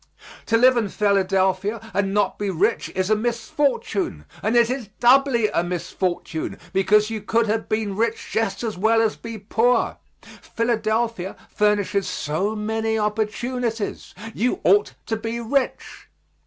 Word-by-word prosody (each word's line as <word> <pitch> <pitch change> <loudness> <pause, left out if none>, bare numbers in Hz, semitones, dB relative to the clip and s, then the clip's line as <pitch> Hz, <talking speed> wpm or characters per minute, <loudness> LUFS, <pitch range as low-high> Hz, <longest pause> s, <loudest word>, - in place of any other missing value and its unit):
To 225 - +3
live 255 +1 +5
in 220 -4 0
Philadelphia 195 +1 +1
and 195 +1 0
not 205 -1 0
be 205 -1 -1
rich 190 +6 0
is 185 +2 0
a - - +6
misfortune, 230 - -1 0.2
and 220 +3 0
it 235 -1 +5
is 250 -2 -3
doubly 245 -2 +4
a 170 - 0
misfortune, 175 -2 -3 0.2
because 210 +3 +3
you 220 -1 -3
could 230 +3 +1
have 220 +1 -2
been 215 -2 -1
rich 230 +3 -1
just 225 -1 -1
as 215 -5 -3
well 225 +3 +3
as 225 -1 +2
be 230 -1 -7
poor. 225 +4 +1 0.3
Philadelphia 225 -3 -2 0.2
furnishes 205 -2 +1
so 185 +9 -2
many 220 +1 -1
opportunities. 220 +2 -2 0.2
You 250 - 0
ought 410 +1 +3
to 225 - -1
be 225 +2 -4
rich. 255 +4 -2
220 Hz, 140 wpm, -23 LUFS, 200-230 Hz, 0.3 s, a